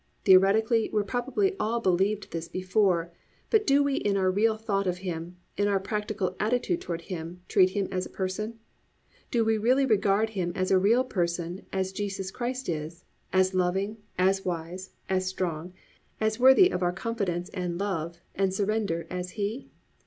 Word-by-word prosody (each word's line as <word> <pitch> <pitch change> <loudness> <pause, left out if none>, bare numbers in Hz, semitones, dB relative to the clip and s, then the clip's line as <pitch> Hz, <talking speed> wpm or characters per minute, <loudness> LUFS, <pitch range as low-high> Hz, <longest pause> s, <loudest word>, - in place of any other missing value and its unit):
Theoretically 210 +4 +5
we 210 -1 +1
probably 265 - 0
all 230 +2 0
believed 195 +1 +1
this 165 0 -4
before, 185 -3 +1 0.4
but 435 -2 +3
do 280 +1 +5
we 280 -1 0
in 200 -1 +1
our 185 -1 +2
real 220 +3 +2
thought 200 -3 -1
of 180 0 0
Him, 175 0 -5 0.2
in 205 - +2
our 200 -1 +2
practical 210 -2 -2
attitude 245 +11 0
toward 170 - -4
Him, 170 0 -7
treat 185 -2 +5
Him 195 0 -1
as 185 -1 -2
a - - -19
person? 210 +4 -3 0.7
Do 230 -2 +1
we 220 -1 +2
really 255 +5 +3
regard 215 -1 +2
Him 180 -4 -2
as 185 0 +1
real 205 +6 +4
a - - -3
person 175 -3 -2
as 190 -1 -1
Jesus 195 -1 -3
Christ 250 +3 -4
is, 165 +1 -4 0.3
as 185 0 +3
loving, 190 +4 0 0.2
as 190 +1 +2
wise, 180 +1 -4 0.2
as 185 -1 0
strong, 180 -2 -3 0.5
as 220 +1 0
worthy 265 +9 +7
of - - -2
our 175 -1 +2
confidence 190 -3 -3
and 180 -2 -3
love, 170 -4 -3 0.2
and 195 -1 +1
surrender 200 -3 -1
as 180 0 -4
He? 215 +6 -3
195 Hz, 170 wpm, -27 LUFS, 180-220 Hz, 0.7 s, worthy